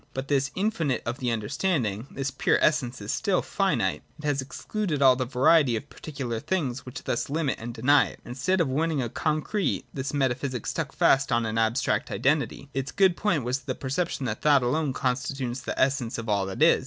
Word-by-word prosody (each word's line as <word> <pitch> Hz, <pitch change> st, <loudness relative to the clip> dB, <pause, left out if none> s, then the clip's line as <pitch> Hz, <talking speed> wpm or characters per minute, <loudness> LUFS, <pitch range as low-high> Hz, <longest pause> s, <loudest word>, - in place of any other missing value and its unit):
But 135 Hz, +1 st, -4 dB
this 140 Hz, -1 st, +2 dB
infinite 185 Hz, -, 0 dB
of 115 Hz, +1 st, -3 dB
the 125 Hz, -, -1 dB
understanding, 115 Hz, -, -1 dB
this 135 Hz, 0 st, -3 dB
pure 135 Hz, -, +2 dB
essence, 130 Hz, -5 st, +1 dB
is 100 Hz, -, -3 dB
still 200 Hz, -4 st, +1 dB
finite: 130 Hz, -, 0 dB, 0.2 s
it 155 Hz, -, -13 dB
has 145 Hz, -2 st, +1 dB
excluded 165 Hz, +4 st, -3 dB
all 130 Hz, -2 st, +6 dB
the 130 Hz, 0 st, -1 dB
variety 130 Hz, 0 st, +4 dB
of 135 Hz, +6 st, -6 dB
particular 130 Hz, -7 st, -5 dB
things, 135 Hz, -6 st, -2 dB
which 125 Hz, -, -7 dB
thus 120 Hz, -, -2 dB
limit 150 Hz, -2 st, -1 dB
and 120 Hz, +1 st, -5 dB
deny 130 Hz, +5 st, +4 dB
it. -, -, -12 dB
Instead 135 Hz, +10 st, 0 dB
of 165 Hz, -, +2 dB
winning 155 Hz, +3 st, 0 dB
a 120 Hz, -3 st, -1 dB
con 155 Hz, +5 st, -1 dB
crete, 210 Hz, -3 st, -1 dB
this 135 Hz, 0 st, -3 dB
metaphysic 130 Hz, -3 st, -1 dB
stuck 155 Hz, -4 st, -2 dB
fast 135 Hz, 0 st, +3 dB
on 115 Hz, 0 st, +2 dB
an 110 Hz, 0 st, -1 dB
abstract, 115 Hz, +3 st, +1 dB
identity. 140 Hz, 0 st, 0 dB
Its 135 Hz, 0 st, -3 dB
good 190 Hz, -3 st, +4 dB
point 170 Hz, -, 0 dB
was 125 Hz, +3 st, -1 dB
the 130 Hz, 0 st, -4 dB
perception 140 Hz, +1 st, -2 dB
that 110 Hz, -3 st, -3 dB
thought 145 Hz, -3 st, +4 dB
alone 145 Hz, +4 st, +1 dB
con 125 Hz, -1 st, 0 dB
stitutes 130 Hz, -1 st, -4 dB
the -, -, -4 dB
essence 130 Hz, -3 st, +1 dB
of 115 Hz, 0 st, -5 dB
all 100 Hz, -2 st, +1 dB
that 95 Hz, +10 st, 0 dB
is. 165 Hz, -, +6 dB
135 Hz, 205 wpm, -26 LUFS, 120-150 Hz, 0.2 s, all